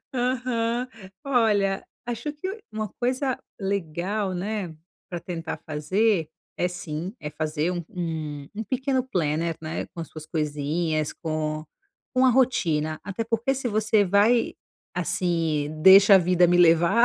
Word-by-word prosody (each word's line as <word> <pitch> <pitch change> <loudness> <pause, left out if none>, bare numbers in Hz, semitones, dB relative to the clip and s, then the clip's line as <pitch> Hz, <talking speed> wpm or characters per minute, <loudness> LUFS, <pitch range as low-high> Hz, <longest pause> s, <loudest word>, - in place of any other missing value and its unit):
Aham. 245 -1 0 0.4
Olha, 210 -7 +2 0.2
acho 240 +5 -3
que 375 +8 -5
uma 215 0 -3
coisa 255 +1 0 0.2
legal, 195 +1 -2
né, 185 -2 -3 0.4
para 175 -2 -4
tentar 165 -2 -5
fazer 165 +3 +1 0.3
é, 180 - +1
sim, 175 +1 -5
é 150 - -4
fazer 155 +2 -1
um 175 -2 -3
um 155 -5 -4
um 220 - -4
pequeno 260 +2 0
planner 165 - 0
né, 160 0 -4
com 170 - -6
as 165 - -6
suas 155 -1 -9
coisinhas, 155 0 -1
com 155 -1 -3 0.5
com 255 +1 +4
a 260 - +6
rotina. 165 -12 +1
Até 200 +3 -3
porque, 230 +4 0
se 260 -2 -2
você 215 -1 +3
vai, 210 +5 +3 0.4
assim, 165 -4 0
"Deixa 195 +1 +9
a 190 - +9
vida 180 0 +4
me 175 +1 +3
levar", 170 +6 +5
180 Hz, 140 wpm, -25 LUFS, 160-230 Hz, 0.5 s, Deixa